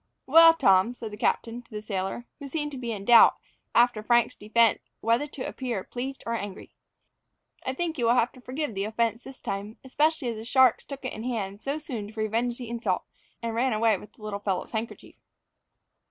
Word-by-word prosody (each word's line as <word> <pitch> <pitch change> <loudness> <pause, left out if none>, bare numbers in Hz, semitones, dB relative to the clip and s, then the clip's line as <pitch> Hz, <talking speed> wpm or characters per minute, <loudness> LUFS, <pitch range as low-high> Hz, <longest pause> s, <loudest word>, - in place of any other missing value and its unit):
"Well, 330 +3 +8
Tom," 225 -4 +4
said 225 -3 -7
the - - -6
captain 230 +2 -1
to 245 - -29
the 215 - -5
sailor, 195 +3 -3
who 285 - -7
seemed 295 +1 -3
to 275 - -7
be 240 -2 -3
in 200 -3 -5
doubt 235 0 +8 0.4
after 240 -2 +4
Frank's 235 +1 +3
defence 225 +1 +2 0.2
whether 230 +6 +1
to 270 -3 -6
appear 240 -7 -3
pleased 265 +2 -6
or 230 - -2
angry, 205 -4 -6 0.9
"I 260 - -1
think 330 -1 -2
you 240 - +1
will 235 - +5
have 245 0 +2
to 255 - -16
forgive 260 +1 -4
the 195 0 -2
offence 230 +1 -1
this 265 -1 -11
time, 200 +2 -5
especially 295 +1 +1
as 230 - -4
the 220 - -7
sharks 255 +1 +4
took 275 -1 -8
it 255 - -3
in 215 - -7
hand 210 -5 -3
so 280 +2 -2
soon 255 -10 -6
to 220 +1 -10
revenge 230 +3 0
the 245 - -7
insult, 225 -5 -1 0.4
and 230 -1 -2
ran 245 +2 +1
away 220 0 +3
with 210 - -14
the 215 - -18
little 210 -1 -4
fellow's 195 -3 -2
handkerchief." 225 0 -6
235 Hz, 210 wpm, -27 LUFS, 215-260 Hz, 0.9 s, Well